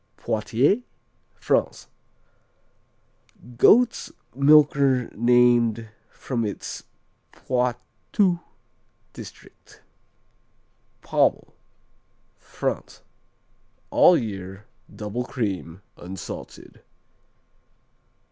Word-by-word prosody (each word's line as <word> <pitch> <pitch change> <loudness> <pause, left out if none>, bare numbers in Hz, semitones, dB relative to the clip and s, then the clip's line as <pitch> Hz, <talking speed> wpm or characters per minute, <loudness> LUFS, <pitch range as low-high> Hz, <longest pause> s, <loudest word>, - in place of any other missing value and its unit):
Poitiers 115 - +1 0.6
France - - -1 1.7
Goat's 235 - +4 0.2
milker 140 -2 +4
named 120 -1 +3 0.2
from 120 -3 -4
its 105 -2 -6 0.5
Poitou 125 - -1 0.7
district. - - -14 1.2
Pommel - - +1 0.8
France - - -5 0.9
All 180 - +6
year. 95 -4 -6 0.2
Double 105 +3 -5
cream; 100 -8 -4
unsalted. 90 -8 -9
120 Hz, 50 wpm, -24 LUFS, 105-135 Hz, 1.7 s, All